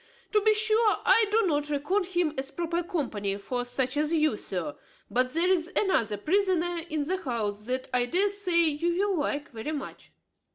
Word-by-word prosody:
To 425 - +3
be 435 +1 +4
sure, 435 0 +3
I 445 -1 +5
do 445 +2 +3
not 295 -4 0
reckon 300 +8 0
him 345 -4 0
as 265 0 -4
proper 340 +2 -2
company 240 - -3
for 245 +5 -3
such 255 +2 -1
as 300 +1 +1
you, 310 -5 +2
sir; 175 -7 -4 0.4
but 255 +1 +2
there 335 +3 +2
is 350 -2 0
another 230 - +1
prisoner 350 - +1
in 305 -1 -1
the 365 +6 -1
house 215 - -3
that 255 +1 -2
I 245 -1 +2
dare 380 +9 +3
say 370 -4 +2
you 335 +3 0 0.2
will 365 - 0
like 290 0 -2
very 245 +6 -5
much. 285 -3 -7
310 Hz, 190 wpm, -27 LUFS, 255-365 Hz, 0.4 s, I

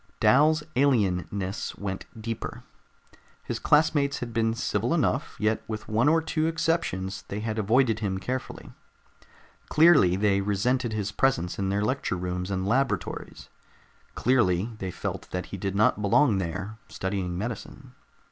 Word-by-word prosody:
Dal's 150 +3 +4
alienness 100 -6 0
went 95 -2 -5
deeper. 115 0 -5 0.8
His - - -4
classmates 150 -2 +3
had 120 -2 -6
been 115 0 +1
civil - - 0
enough, - - 0
yet 110 +1 +1
with 110 -1 -5
one 115 +7 +3
or 160 +1 +3
two 155 0 0
exceptions, 160 - -1
they 100 +2 -4
had 110 0 -2
avoided 110 +1 +2
him 100 -3 -2
carefully. 125 +7 -5 1.0
Clearly 155 - +6
they 100 0 +2
resented 115 +5 0
his 105 -1 -2
presence 105 -9 0
in 95 -1 0
their 100 +1 0
lecture 130 -6 -1
rooms 90 +1 -3
and 95 -1 -2
laboratories. 115 -5 -2 0.7
Clearly 115 -5 +2
they 95 - -3
felt 90 - -5
that 90 0 -3
he 100 - -7
did 95 +1 -3
not 105 +1 +3
belong 105 +1 +3
there, 95 +5 -4
studying 95 -2 -3
medicine. 125 +5 -6
110 Hz, 140 wpm, -26 LUFS, 95-130 Hz, 1.0 s, Clearly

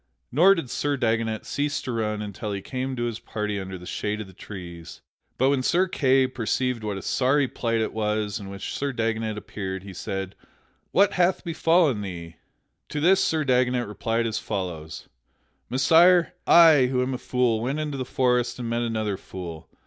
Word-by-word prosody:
Nor 180 +9 +6
did 135 -9 -5
Sir 145 -1 -1
Dagonet 115 -2 0
cease 145 0 -1
to 130 - -4
run 105 -2 -2
until 105 +1 -5
he 100 - -3
came 130 0 -3
to 120 - -2
his 115 -2 -3
party 105 -2 -3
under 95 -1 -6
the 90 - -12
shade 105 +3 -3
of 110 - -5
the 95 - -15
trees. 85 -4 -9 0.4
But 130 +2 +3
when 140 -2 +1
Sir 180 +8 +2
Kay 135 -6 +3
perceived 125 -1 -1
what 105 -2 -3
a 95 - -7
sorry 135 +2 +2
plight 115 -2 -1
it 110 - -2
was 105 -1 -1
in 100 -1 -8
which 100 0 -6
Sir 140 -1 -2
Dagonet 110 -2 -1
appeared, 95 -3 -5
he 100 -1 -9
said, 95 +1 -4 0.6
"What 200 +1 +4
hath 180 +1 +2
befallen 165 - +2
thee?" 85 -4 -7 0.5
To 150 - -3
this 185 +5 +4
Sir 160 -1 +1
Dagonet 125 -1 +2
replied 115 +3 -1
as 115 0 -1
follows: 85 -6 -5 0.6
"Messire, 165 +7 +5
I, 160 -6 +7
who 125 0 +1
am 130 +1 -2
a 125 - -4
fool, 125 -3 +1
went 135 +6 -2
into 150 -3 -3
the - - -1
forest 125 -1 +1
and 120 -2 -4
met 115 +1 -1
another 110 -4 -1
fool. 85 -5 -8
115 Hz, 185 wpm, -25 LUFS, 105-135 Hz, 0.6 s, I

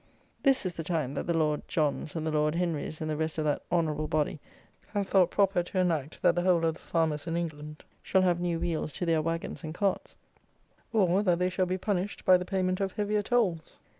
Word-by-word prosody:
This 270 -6 +3
is 180 - -2
the 165 - -5
time 155 -5 -1
that 140 - -4
the 170 -1 +1
Lord 150 -2 +1
Johns 150 0 -1
and 160 -1 -2
the 160 - 0
Lord 150 +1 +1
Henries 165 -3 -2
and 155 - -2
the - - -1
rest 160 +1 -2
of 155 - -1
that 145 -1 0
Honourable 155 -3 0
body 150 0 0 0.5
have 205 -1 0
thought 185 -3 +4
proper 195 -2 +2
to 175 +2 -6
enact 165 -5 0
that - - +5
the 175 - +1
whole 175 -2 +3
of 160 - +2
the 160 - -14
farmers 160 -2 -1
in 165 0 -1
England 150 -2 -5 0.2
shall 190 -1 +2
have 175 -2 +2
new 175 -1 -1
wheels 165 -3 -2
to 180 - -3
their 165 -2 +2
wagons 165 +2 -3
and 155 0 -6
carts, 195 0 -1 0.8
or, 195 -3 +3
that 180 -4 +2
they 180 +1 0
shall 185 0 0
be 185 +1 -1
punished 195 0 -2
by 185 - +7
the 180 0 0
payment 185 -1 0
of 195 -1 -1
heavier 210 0 0
tolls! 200 -8 0
170 Hz, 225 wpm, -29 LUFS, 155-185 Hz, 0.8 s, by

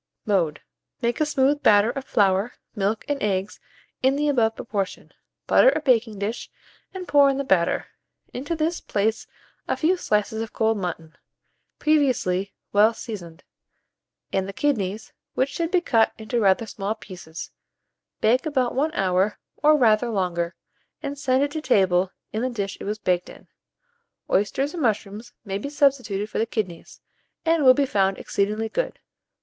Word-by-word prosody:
Mode. 175 -8 +1 0.4
Make 235 +5 0
a 305 - +3
smooth 290 0 +2
batter 210 -3 +5
of 270 0 -6
flour, 200 +1 +2 0.2
milk, 205 +1 -1
and 290 -1 -2
eggs 195 -1 -1 0.4
in 265 +1 +3
the 295 +1 +1
above 225 -5 +2
proportion; 200 -4 -4 0.3
butter - - +6
a - - +1
baking 240 -7 +2
dish, 205 +4 -4 0.4
and 370 -2 -7
pour 285 -1 +6
in 270 - 0
the 275 - -1
batter. 180 -9 +2 0.5
Into 285 +7 -3
this 320 +2 -1
place 215 +2 -1 0.4
a - - -1
few 350 +4 +2
slices 215 - 0
of 225 - -6
cold 220 -1 +1
mutton, 165 -3 -5 0.6
previously 250 -11 +1 0.2
well 215 +3 +5
seasoned, 175 -9 -8 0.9
and 190 0 0
the - - -6
kidneys, 215 -6 -1 0.2
which 260 +2 +1
should 330 +3 -2
be 360 -1 +2
cut 225 -9 +2
into 220 +2 -2
rather 200 +1 +3
small 210 0 -3
pieces; 170 -5 -9 0.7
bake 250 +7 +3
about 260 -5 0
1 295 +5 +1
hour, 190 +2 +1 0.2
or 305 0 +5
rather 235 -2 +3
longer, 180 -4 -1 0.5
and 280 -1 -4
send 265 -1 +2
it 285 - -1
to 315 - -4
table 190 -8 +2 0.2
in 220 - -1
the 255 - 0
dish 200 -5 -3
it - - -5
was 210 +2 -2
baked 180 -4 0
in. - - -14 0.8
Oysters 235 - +1
or 350 - -5
mushrooms 215 -3 -2
may 195 -1 -3
be 280 - -5
substituted 265 -9 +1
for - - -4
the 225 - +1
kidneys, 185 -7 -5 0.4
and 325 -2 +3
will 255 -1 +8
be 280 - +2
found 195 -5 +1
exceedingly 210 +3 -1
good. - - -2
220 Hz, 165 wpm, -24 LUFS, 195-275 Hz, 0.9 s, will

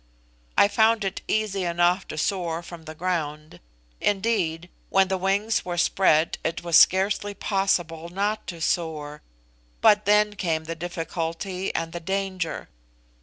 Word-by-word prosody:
I - - +7
found 220 +1 +3
it 195 0 -3
easy 210 -3 0
enough 175 +2 +1
to - - -7
soar 170 -1 -1
from 170 -1 -11
the 155 -1 -8
ground; 155 - -3 0.4
indeed, 190 -5 0 0.2
when 195 -1 +3
the 190 - 0
wings 200 +4 +1
were 175 -1 -4
spread 170 -2 +2
it 165 +2 -3
was 170 -2 0
scarcely 200 +2 +4
possible 175 -5 -1
not 205 +4 -2
to 170 -3 -7
soar, 155 -3 -2 0.6
but 210 0 +5
then 210 +1 +4
came 165 -6 -1
the 165 +1 -5
difficulty 175 +2 -4
and 165 0 -2
the 170 - -4
danger. 190 -1 -3
180 Hz, 140 wpm, -25 LUFS, 165-195 Hz, 0.6 s, I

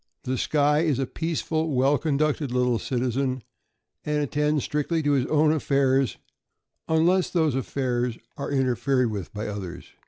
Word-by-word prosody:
The 130 - -1
Skye 150 +3 +2
is 155 -5 +1
a 135 - 0
peaceful, 160 0 -2
well 135 +2 +3
conducted 150 -2 0
little 125 -2 +1
citizen, 130 0 -1 0.6
and 150 0 0
attends 150 +1 0
strictly 155 +2 -1
to 145 - +2
his 135 -2 +2
own 155 0 +3
affairs, 135 -4 +1 0.7
unless 175 +4 +3
those 160 -5 +1
affairs 125 -2 -1 0.2
are 140 - -5
interfered 130 -2 +1
with 100 -4 -5
by 105 +1 -5
others. 95 -4 -6
140 Hz, 145 wpm, -25 LUFS, 125-150 Hz, 0.7 s, well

